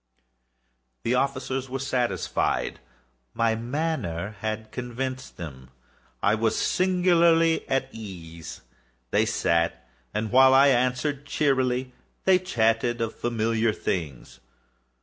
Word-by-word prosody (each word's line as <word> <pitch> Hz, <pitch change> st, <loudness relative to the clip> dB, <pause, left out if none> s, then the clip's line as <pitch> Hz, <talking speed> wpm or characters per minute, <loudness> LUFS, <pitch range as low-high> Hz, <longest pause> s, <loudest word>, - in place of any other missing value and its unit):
The 115 Hz, -, +1 dB
officers 135 Hz, 0 st, -1 dB
were 135 Hz, -, -3 dB
satisfied. 125 Hz, -8 st, -1 dB, 0.6 s
My 115 Hz, -1 st, +2 dB
manner 115 Hz, -, -2 dB
had 110 Hz, 0 st, -4 dB
convinced 130 Hz, +1 st, -5 dB
them. 65 Hz, -7 st, -9 dB, 0.5 s
I 100 Hz, -, +4 dB
was 110 Hz, 0 st, +1 dB
singularly 170 Hz, -3 st, +3 dB
at 135 Hz, 0 st, +1 dB
ease. 85 Hz, -6 st, -9 dB, 0.5 s
They -, -, +3 dB
sat, 85 Hz, 0 st, 0 dB, 0.2 s
and 105 Hz, +1 st, -2 dB
while 130 Hz, +1 st, +7 dB
I 140 Hz, +1 st, +7 dB
answered 130 Hz, +3 st, 0 dB
cheerily, 130 Hz, -3 st, +1 dB, 0.3 s
they 190 Hz, -1 st, +5 dB
chatted 120 Hz, -8 st, +1 dB
of 115 Hz, -1 st, -2 dB
familiar 115 Hz, -1 st, 0 dB
things. 75 Hz, -, -4 dB
120 Hz, 105 wpm, -26 LUFS, 110-135 Hz, 0.6 s, while